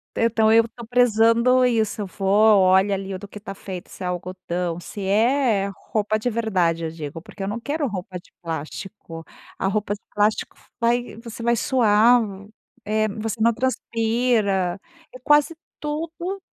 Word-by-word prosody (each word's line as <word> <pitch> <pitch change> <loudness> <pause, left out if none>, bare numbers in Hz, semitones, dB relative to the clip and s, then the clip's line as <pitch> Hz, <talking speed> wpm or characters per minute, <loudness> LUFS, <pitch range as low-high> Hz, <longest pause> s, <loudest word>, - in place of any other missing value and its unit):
Então 225 -1 +3
eu 230 +1 +5
tô 235 0 -11
prezando 245 +1 +4
isso. 220 -3 0
Eu 200 - -4
vou, 205 +2 +4
olho 190 +2 +4
ali 195 0 -4
o 185 - -5
do 205 - -9
que 210 - -10
tá 195 -1 -7
feito, 185 -2 -8
se 185 - -9
é - - -2
algodão, 180 -1 -3
se 200 +4 -8
é 220 0 +2 0.2
roupa 215 0 +1
de 245 - -1
verdade, 185 -8 0
eu 160 - -4
digo, 160 0 -7
porque 195 +2 -9
eu - - -2
não 220 +3 -3
quero 290 +3 -2
roupa 185 -3 -5
de - - -24
plástico. 165 +1 -7 0.3
A 190 - -1
roupa 205 0 -1
de 205 - -9
plástico 210 +1 0 0.2
vai 240 0 0
você 230 0 -9
vai 235 0 +3
suar, 235 0 +4 0.6
é 215 +1 +1
você 220 +2 -4
não 230 +1 +4
transpira 225 -6 0 0.3
é 255 - -10
quase 295 +4 +3 0.2
tudo 330 +5 -4
215 Hz, 165 wpm, -23 LUFS, 190-235 Hz, 0.6 s, eu